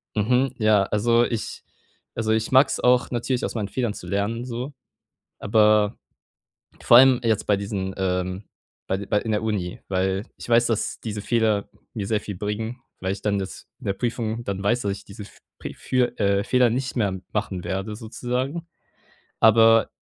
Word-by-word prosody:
Mhm, 125 +5 +2
ja, 110 -2 +4
also, 115 +4 +2
ich 115 -3 -4 0.5
also, 110 -1 -1
ich 110 0 0
mag's 130 +2 +4
auch 125 0 +3
natürlich, 120 +1 -2
aus - - -3
meinen 105 -3 -2
Fehlern 120 -3 -1
zu - - -9
lernen 105 +4 -1
so, 125 +3 -5 0.7
aber 105 0 +3 0.9
vor 120 - +7
allem 130 0 +7
jetzt 110 -3 0
bei 105 - +3
diesen, 100 -1 -4
ähm 95 +1 -2 0.4
bei 95 +1 -2
bei 105 0 +1
in 110 - -4
der 105 0 0
Uni, 100 -5 -2
weil 95 +1 0
ich - - -10
weiß, 120 0 +4
dass 115 -3 -1
diese 105 -2 -5
Fehler 110 -2 +1 0.3
mir 100 -3 -3
sehr 110 -2 +1
viel 100 - -6
bringen, 110 +5 -4 0.2
weil 95 +1 -2
ich 100 - -7
dann 100 -1 +1
das 95 -1 -7
in - - -11
der 100 - +1
Prüfung 115 +1 -3
dann 100 -4 -4
weiß, 120 +5 +2
dass 100 - -1
ich 100 - -8
diese 100 +1 -10
F 100 - -14 0.2
Pre - - -6
für, 125 -1 0
äh 100 -1 +2
Fehler 125 +3 +3
nicht 130 +3 -2
mehr 100 -5 0
machen 100 -4 -2
werde 95 +3 -3
sozusagen. 125 +8 -4 0.7
Aber 115 0 +6
110 Hz, 180 wpm, -24 LUFS, 100-120 Hz, 0.9 s, vor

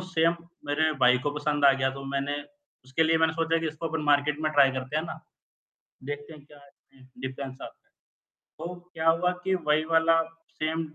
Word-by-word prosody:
same 170 -2 +1 0.3
मेरे 155 +2 +2
भाई 125 0 +6
को - - +2
पसंद 145 -1 0
आ 140 - +8
गया 135 0 +1
तो 135 0 -8
मैंने 140 +1 -1 0.5
उसके 130 +5 0
लिए 160 0 +3
मैंने 160 0 +3
सोचा 165 0 +1
कि 165 - -2
इसको 160 +1 -4
अपन 160 -1 -2
मार्केट 145 +1 +3
में 155 - +1
ट्राई 140 -2 +6
करते 130 +2 -4
हैं 155 - +1
ना 165 - -7 0.9
देखते 145 +2 -6
हैं 150 -2 -14
क्या 150 -1 -16 0.7
डिफरेंस 130 0 -6
आता - - -11
है - - -43 0.7
तो 175 +2 -5 0.2
क्या 160 0 +1
हुआ 165 +2 +3
कि 190 0 +2
वही 155 +1 +3
वाला 165 0 +4 0.4
सेम 160 +1 -1
155 Hz, 190 wpm, -27 LUFS, 145-165 Hz, 0.9 s, आ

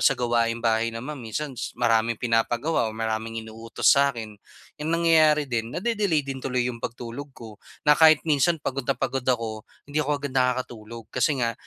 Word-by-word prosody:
sa - - +4
gawaing 115 -1 0
bahay 115 0 +2
naman, 130 +6 -6
minsan 135 +6 -4 0.2
maraming 115 -1 +2
pinapagawa 120 +4 0
o 110 - -6
maraming 110 0 -3
inuutos 115 +4 +1
sa 140 -1 +3
akin. 110 -2 -6 0.5
Ang 155 +2 -2
nangyayari 155 -3 +4
din, 120 0 -3
na-de-delay 200 - 0
din 135 -1 -5
tuloy 125 -2 -1
'yong 115 - -10
pagtulog 120 +5 -6
ko, 110 -3 -11 0.2
na 150 - +7
kahit 155 0 +6
minsan 155 +2 +2
pagod 135 -1 -3
na 140 - +2
pagod 135 -1 -2
ako, 115 -3 -1 0.2
hindi 145 +2 -2
ako 150 0 -2
agad 140 - -3
nakakatulog 120 -3 -2
kasi 130 +3 +1
nga 120 -2 0
125 Hz, 175 wpm, -25 LUFS, 115-145 Hz, 0.5 s, na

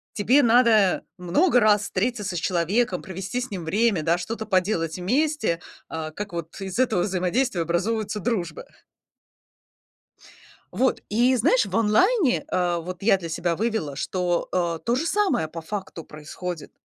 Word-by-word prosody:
Тебе 255 +7 +4
надо 225 -5 +4
много 245 - +3
раз 210 -1 +4
встретиться 205 -1 -2
с - - -1
человеком, 185 +8 0
провести 190 +4 -5
с 255 +1 -4
ним 185 -4 -5
время, 200 +1 +1
да, 165 +2 +2
что-то 220 +5 -5
поделать 185 -5 0
вместе, 230 - 0 0.3
э, 160 -1 -5
как 205 +1 -6
вот 170 -1 -6
из 195 +2 -5
этого 235 -9 +2
взаимодействия 190 +2 0
образовываются 205 +6 -1
дружбы. 180 -7 -3 2.1
Вот 260 +1 +1
и 240 +5 +3
знаешь, 245 0 +3
в 190 -2 -5
онлайне, 265 - +3
э, 175 -1 0
вот 180 +2 -7
я 200 -2 +5
для 175 -3 -7
себя 170 +1 -2
вывела, 215 -11 -2
что, 180 0 -1
э, 170 -2 0
то 235 - +2
же 290 +6 -1
самое 365 - +1
по 165 - -7
факту 170 -2 -6
происходит. 155 +3 -7
195 Hz, 150 wpm, -24 LUFS, 175-230 Hz, 2.1 s, я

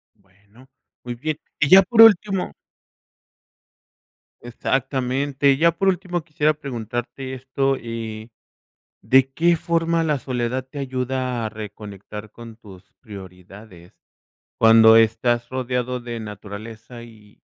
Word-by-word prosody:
Bueno, 105 +5 -24 0.4
muy 120 0 -6
bien. 155 +5 -4 0.2
Y 150 - +2
ya 190 +1 +9
por 225 +4 +4
último 200 -3 +4 1.9
Exactamente, 135 +3 -1
y 135 - +1
ya 170 +2 +4
por 195 +4 -2
último 180 -2 -1
quisiera 155 -1 0
preguntarte 130 -1 -6
esto, 135 +1 -1
eh, 115 -1 -7 0.7
¿de 130 +5 +4
qué 170 +2 +2
forma 165 0 0
la 150 -2 0
soledad 125 -1 -3
te 140 +2 -9
ayuda 130 -2 -3
a - - -3
reconectar 105 -1 -10
con 115 -1 -12
tus 100 -3 -16
prioridades 95 -3 -13 0.7
cuando 115 0 +7
estás 115 +2 +1
rodeado 125 -1 -3
de 120 -1 -7
naturaleza 110 +3 -10
y 110 -3 -18
125 Hz, 115 wpm, -21 LUFS, 110-140 Hz, 1.9 s, ya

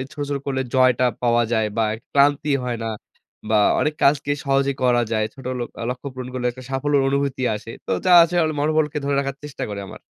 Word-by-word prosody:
ছোট, 150 - -5
ছোট 140 - -1
করলে 130 -1 -1
জয়টা 130 -1 +4 0.2
পাওয়া 120 -1 +3
যায় 110 -2 +2
বা, 115 - +2
এক 110 - -10
ক্লান্তি 145 +1 +3
হয় 120 -1 -2
না। - - -2 0.6
বা, 110 - +3 0.2
অনেক 150 0 0
কাজকে 140 0 +3
সহজে 135 0 +2
করা 120 -1 +3
যায়। 110 -1 +1
ছোট 135 - -13 0.2
লক 120 - -3 0.2
লক্ষ্য 125 +2 -6
পূরণ 130 -1 -6
করলে 125 -1 -2
একটা 130 +1 -12
সাফল্যর 140 +1 +1
অনুভূতি 140 -1 -1
আসে। 110 +2 -10 0.2
তো - - -5
যা 180 - +4
আছে 170 +1 0
অল 155 - 0
মনোবলকে 150 0 +1
ধরে 140 - 0
রাখার 140 -1 -4
চেষ্টা 150 - -7
করে 100 -1 -5
আমার। - - -11
135 Hz, 215 wpm, -22 LUFS, 125-145 Hz, 0.6 s, জয়টা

